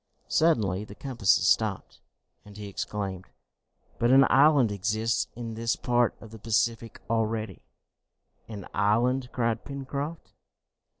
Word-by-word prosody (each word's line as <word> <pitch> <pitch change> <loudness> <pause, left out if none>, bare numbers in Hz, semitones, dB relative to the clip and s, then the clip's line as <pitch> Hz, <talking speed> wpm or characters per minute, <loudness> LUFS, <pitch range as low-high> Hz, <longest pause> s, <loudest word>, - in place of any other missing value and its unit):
Suddenly 105 - +2
the 105 -1 -11
compasses 120 -8 +1
stopped, - - 0 0.4
and 105 0 -14
he 105 -1 -7
exclaimed, 95 -2 -5 0.7
"But 120 - +2
an 135 +1 +7
island 140 -5 +5
exists 110 +3 -1
in 115 -1 -6
this 115 +1 -1
part 120 -1 +1
of 115 - -13
the 110 - -11
Pacific 115 +1 -1
already!" 110 -3 -2 0.9
"An 105 -4 -8
island?" 120 +5 +1
cried 115 -2 -1
Pencroft. 140 +3 -6
115 Hz, 120 wpm, -27 LUFS, 105-125 Hz, 0.9 s, an